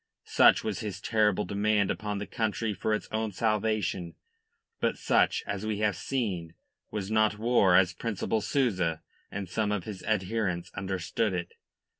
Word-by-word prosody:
Such - - +5
was 110 -3 -2
his 105 -5 -5
terrible 105 -2 +2
demand 100 +1 +1
upon 105 -1 -3
the 100 - -4
country 110 0 -1
for 100 +3 -2
its - - -5
own 110 0 -1
salvation. 105 -5 -1 0.6
But - - 0
such, - - +2
as 100 0 -3
we 110 -1 -1
have 105 -3 +2
seen, 90 -4 -3 0.3
was 105 -1 -4
not 110 -1 +3
war 110 -5 +4
as 90 -1 +5
Principal 110 +2 -2
Souza 90 - 0 0.3
and 100 -1 -5
some 105 +3 -1
of 105 -4 -1
his 100 -4 -7
adherents 95 -4 -1
understood 95 +2 -1
it. 85 -1 -4
105 Hz, 155 wpm, -29 LUFS, 95-110 Hz, 0.6 s, Such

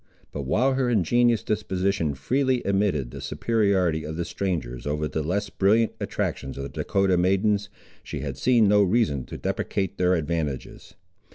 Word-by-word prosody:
But 70 -3 -5
while 130 - +2
her 130 -2 +1
ingenuous 120 +2 +3
disposition 95 -6 -1
freely 130 - 0
admitted 95 -11 0
the - - -8
superiority 95 -8 +1
of 80 +1 -5
the 85 - -2
strangers 75 -10 -3
over 75 +1 -1
the 80 +2 -2
less 95 +6 -2
brilliant 110 +3 +2
attractions 70 0 -3
of 70 - -4
the 70 - -5
Dahcotah 95 -2 +2
maidens, 100 +3 +1 0.3
she - - -6
had - - -4
seen 120 -4 +3
no 105 +1 +5
reason 95 - +1
to - - -8
deprecate 95 0 -2
their 90 0 +3
advantages. 80 -4 -4
95 Hz, 160 wpm, -25 LUFS, 80-110 Hz, 0.3 s, no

